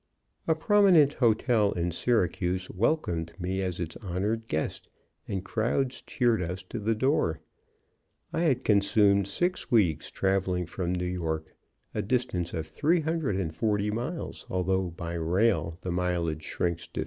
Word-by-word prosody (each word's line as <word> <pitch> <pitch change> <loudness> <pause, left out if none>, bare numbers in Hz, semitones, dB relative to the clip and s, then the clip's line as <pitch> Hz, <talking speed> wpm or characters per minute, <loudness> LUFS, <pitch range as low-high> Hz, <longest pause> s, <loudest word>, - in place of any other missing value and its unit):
A 160 - +3
prominent 175 -5 +5
hotel 115 -3 +2
in 85 0 -1
Syracuse 90 -3 0
welcomed 90 - 0
me 95 +2 -2
as 90 -3 -2
its 85 -2 -4
honored 105 +3 -2
guest, 80 -4 -3 0.4
and 95 -1 -3
crowds 125 +5 -1
cheered 120 -5 +1
us 90 +2 -4
to 120 - -4
the 110 +2 0
door. 130 - +1 0.9
I - - 0
had 135 -7 +2
consumed 100 -1 +4
six 180 - -1
weeks 100 - +2
traveling 95 -2 0
from 90 0 -3
New 90 0 -1
York, 80 -3 -3 0.4
a 105 - -1
distance 105 -6 -1
of 80 -1 -3
340 105 - 0
miles, 125 +10 -4
although 95 0 0
by 85 0 -6
rail 85 0 +1
the 90 - -3
mileage 85 -3 -1
shrinks 85 -1 -2
to - - -37
303. - - -4
95 Hz, 140 wpm, -28 LUFS, 90-120 Hz, 0.9 s, prominent